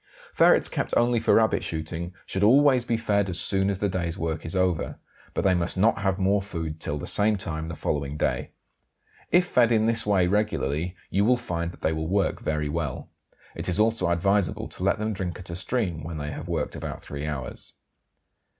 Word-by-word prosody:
Ferrets -, -, +5 dB
kept -, -, -2 dB
only 120 Hz, 0 st, +3 dB
for 110 Hz, -, +3 dB
rabbit 110 Hz, -1 st, +3 dB
shooting 80 Hz, +2 st, -4 dB
should 95 Hz, -, -2 dB
always 130 Hz, +2 st, +5 dB
be 115 Hz, -1 st, 0 dB
fed 100 Hz, -3 st, +1 dB
as 90 Hz, -, 0 dB
soon 95 Hz, 0 st, +2 dB
as 100 Hz, -, -1 dB
the 100 Hz, -, 0 dB
day's 90 Hz, -2 st, -2 dB
work 80 Hz, -1 st, -3 dB
is 80 Hz, -, -5 dB
over, 90 Hz, -3 st, 0 dB, 0.4 s
but -, -, 0 dB
they 95 Hz, -, +4 dB
must 90 Hz, +1 st, -1 dB
not 105 Hz, +2 st, +3 dB
have 95 Hz, -1 st, 0 dB
more 100 Hz, +1 st, +2 dB
food 80 Hz, -5 st, -5 dB
till 75 Hz, -, -3 dB
the 70 Hz, -, -6 dB
same 105 Hz, +1 st, +2 dB
time 80 Hz, -4 st, -4 dB
the 85 Hz, -, -5 dB
following 70 Hz, -1 st, -2 dB
day. -, -, -1 dB, 0.8 s
If 180 Hz, +1 st, +5 dB
fed 120 Hz, -9 st, +3 dB
in 110 Hz, -1 st, +3 dB
this 115 Hz, 0 st, +2 dB
way 100 Hz, -4 st, +3 dB
regularly 90 Hz, -4 st, 0 dB, 0.2 s
you 100 Hz, -, +2 dB
will 125 Hz, +3 st, +4 dB
find 85 Hz, -8 st, -3 dB
that -, -, -17 dB
they 80 Hz, -, +2 dB
will 80 Hz, 0 st, -3 dB
work 100 Hz, 0 st, 0 dB
very 75 Hz, -1 st, -1 dB
well. 75 Hz, -3 st, -3 dB, 0.4 s
It -, -, -5 dB
is 90 Hz, -, -1 dB
also 110 Hz, -4 st, +2 dB
advisable 90 Hz, -1 st, +1 dB
to -, -, -9 dB
let 95 Hz, -, +2 dB
them 110 Hz, +1 st, -2 dB
drink 90 Hz, -3 st, -4 dB
at 90 Hz, -1 st, -9 dB
a -, -, -4 dB
stream 90 Hz, -, -1 dB
when 80 Hz, 0 st, -5 dB
they 75 Hz, 0 st, -4 dB
have 75 Hz, +3 st, -7 dB
worked 85 Hz, -2 st, -2 dB
about -, -, -6 dB
three 75 Hz, +1 st, -5 dB
hours. 65 Hz, -4 st, -6 dB
95 Hz, 210 wpm, -26 LUFS, 80-105 Hz, 0.8 s, Ferrets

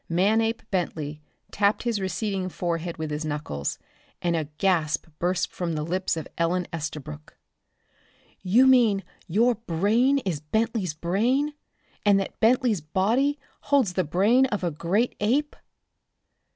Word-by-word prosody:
Manape 220 Hz, +6 st, +2 dB
Bentley 155 Hz, -5 st, -2 dB, 0.3 s
tapped 205 Hz, +1 st, +1 dB
his 230 Hz, -4 st, -1 dB
receding 190 Hz, -1 st, -2 dB
forehead 170 Hz, -1 st, -3 dB
with 155 Hz, -1 st, -4 dB
his 150 Hz, +1 st, -3 dB
knuckles, 145 Hz, -, -3 dB, 0.4 s
and 170 Hz, -1 st, 0 dB
a 155 Hz, -3 st, -2 dB
gasp 160 Hz, -5 st, +1 dB
burst 175 Hz, +1 st, 0 dB
from 175 Hz, -2 st, -3 dB
the 150 Hz, -1 st, -2 dB
lips 180 Hz, +1 st, -1 dB
of 160 Hz, -, -5 dB
Ellen 175 Hz, +2 st, +1 dB
Estabrook. 150 Hz, -1 st, -6 dB, 1.0 s
"You 220 Hz, +8 st, +4 dB
mean 235 Hz, -7 st, +4 dB, 0.2 s
your 230 Hz, +8 st, +3 dB
brain 225 Hz, +6 st, +2 dB
is 170 Hz, -6 st, -1 dB
Bentley's 215 Hz, +2 st, -1 dB
brain, 240 Hz, -, +1 dB, 0.5 s
and 200 Hz, -1 st, +5 dB
that 195 Hz, -, -5 dB
Bentley's 235 Hz, -, +3 dB
body 225 Hz, -, +1 dB, 0.3 s
holds 270 Hz, -10 st, +2 dB
the 185 Hz, -, +1 dB
brain 205 Hz, -, +3 dB
of 210 Hz, -6 st, -3 dB
a 175 Hz, -, 0 dB
great 185 Hz, +10 st, 0 dB
ape?" 275 Hz, +8 st, +1 dB
190 Hz, 135 wpm, -25 LUFS, 165-225 Hz, 1.0 s, and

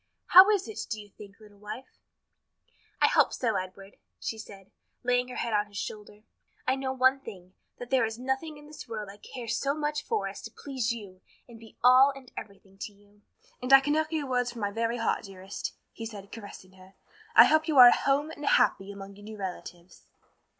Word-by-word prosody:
How 375 Hz, +3 st, +10 dB
is 405 Hz, -3 st, +1 dB
it, 435 Hz, -, -7 dB
do 220 Hz, -, -3 dB
you 205 Hz, -1 st, -12 dB
think, 200 Hz, 0 st, -14 dB
little 210 Hz, -2 st, -18 dB
wife?" 215 Hz, +5 st, -9 dB, 1.0 s
"I -, -, +5 dB
hope -, -, +4 dB
so, 230 Hz, -4 st, -1 dB
Edward," 195 Hz, +1 st, -6 dB, 0.2 s
she 220 Hz, -, -4 dB
said, 195 Hz, -3 st, -12 dB, 0.3 s
laying 245 Hz, 0 st, +1 dB
her 250 Hz, -, -8 dB
head 235 Hz, -2 st, -2 dB
on 210 Hz, 0 st, +1 dB
his 205 Hz, 0 st, -11 dB
shoulder, 210 Hz, 0 st, -7 dB, 0.4 s
"I 260 Hz, -, +3 dB
know 265 Hz, -1 st, -3 dB
one 260 Hz, +1 st, +3 dB
thing 190 Hz, -8 st, -11 dB, 0.2 s
that 245 Hz, -, -9 dB
there 260 Hz, -2 st, +4 dB
is 225 Hz, 0 st, -2 dB
nothing 265 Hz, +5 st, -3 dB
in 295 Hz, -, -14 dB
this 300 Hz, -3 st, -11 dB
world 215 Hz, -3 st, -5 dB
I 200 Hz, -, -15 dB
care 240 Hz, +3 st, -9 dB
so 275 Hz, +5 st, -1 dB
much 300 Hz, 0 st, -2 dB
for 450 Hz, -2 st, -1 dB
as -, -, -8 dB
to -, -, -8 dB
please 260 Hz, -5 st, -3 dB
you 200 Hz, -5 st, -8 dB, 0.3 s
and 235 Hz, -2 st, -13 dB
be 225 Hz, -1 st, -16 dB
all 255 Hz, +3 st, +7 dB
and 265 Hz, -2 st, -13 dB
everything 195 Hz, -1 st, -11 dB
to 210 Hz, -, -6 dB
you." 205 Hz, 0 st, -25 dB, 0.4 s
"And 250 Hz, +1 st, -3 dB
I 270 Hz, -, +10 dB
can 290 Hz, +2 st, 0 dB
echo 315 Hz, +1 st, 0 dB
your 300 Hz, -2 st, -1 dB
words 245 Hz, -1 st, 0 dB
from 235 Hz, -, -9 dB
my 205 Hz, 0 st, -1 dB
very 230 Hz, +2 st, -1 dB
heart, 230 Hz, -, -1 dB
dearest," 195 Hz, 0 st, -7 dB, 0.2 s
he 225 Hz, -, -6 dB
said, 200 Hz, -3 st, -10 dB
caressing 205 Hz, -4 st, -11 dB
her. 190 Hz, 0 st, -18 dB, 0.4 s
"I -, -, +10 dB
hope 315 Hz, +1 st, +3 dB
you 305 Hz, -3 st, 0 dB
are 250 Hz, -1 st, +11 dB
at -, -, +3 dB
home 285 Hz, +3 st, +2 dB
and 295 Hz, -, -10 dB
happy 195 Hz, +1 st, +3 dB
among 200 Hz, 0 st, -10 dB
your 205 Hz, -, -13 dB
new 215 Hz, 0 st, -9 dB
relatives." 180 Hz, -2 st, -8 dB
230 Hz, 215 wpm, -28 LUFS, 200-265 Hz, 1.0 s, are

